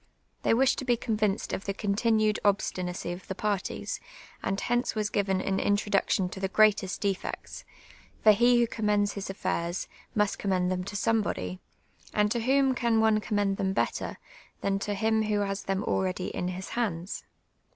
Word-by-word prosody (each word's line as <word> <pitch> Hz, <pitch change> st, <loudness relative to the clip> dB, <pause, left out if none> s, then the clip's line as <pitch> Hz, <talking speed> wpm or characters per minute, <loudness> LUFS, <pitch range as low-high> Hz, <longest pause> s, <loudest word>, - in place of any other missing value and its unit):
They -, -, +3 dB
wished 265 Hz, +2 st, +3 dB
to -, -, -4 dB
be 240 Hz, -2 st, +3 dB
convinced 215 Hz, -4 st, -1 dB
of 195 Hz, -, -3 dB
the 200 Hz, -, -2 dB
continued 215 Hz, +1 st, +2 dB
obstinacy 185 Hz, -3 st, 0 dB
of 175 Hz, +1 st, -8 dB
the 190 Hz, -, -4 dB
parties, 205 Hz, -1 st, -2 dB, 0.4 s
and 195 Hz, +1 st, -1 dB
hence 240 Hz, 0 st, 0 dB
was 215 Hz, -1 st, -1 dB
«;iven 195 Hz, -2 st, +1 dB
an 195 Hz, 0 st, +1 dB
introduction 205 Hz, -2 st, +1 dB
to 190 Hz, -, -7 dB
the 190 Hz, 0 st, -1 dB
j^^reatest 210 Hz, -2 st, +3 dB
defects, 200 Hz, -3 st, -3 dB, 0.6 s
for 215 Hz, -, +9 dB
he 240 Hz, +3 st, +5 dB
who 240 Hz, -, +4 dB
commends 210 Hz, -3 st, +1 dB
his 200 Hz, -, -5 dB
afiairs, 185 Hz, -2 st, -2 dB, 0.3 s
must 210 Hz, -1 st, +1 dB
commi'iid 185 Hz, -2 st, +1 dB
them 185 Hz, 0 st, -1 dB
to 200 Hz, -, -6 dB
somebody, 200 Hz, -, 0 dB, 0.6 s
and 210 Hz, 0 st, +3 dB
to 240 Hz, -, +1 dB
whom 265 Hz, +2 st, +3 dB
can 235 Hz, -3 st, +2 dB
one 220 Hz, -1 st, +4 dB
commend 205 Hz, -2 st, 0 dB
them 190 Hz, 0 st, 0 dB
better, -, -, -1 dB, 0.4 s
than 195 Hz, 0 st, 0 dB
to 205 Hz, +1 st, -2 dB
him 220 Hz, +2 st, +2 dB
who 210 Hz, -1 st, +1 dB
has 195 Hz, 0 st, -2 dB
them 195 Hz, +1 st, -1 dB
already 185 Hz, -1 st, -1 dB
in 180 Hz, -, -1 dB
his 185 Hz, +1 st, -5 dB
hands 195 Hz, -6 st, -2 dB
205 Hz, 170 wpm, -28 LUFS, 190-220 Hz, 0.6 s, for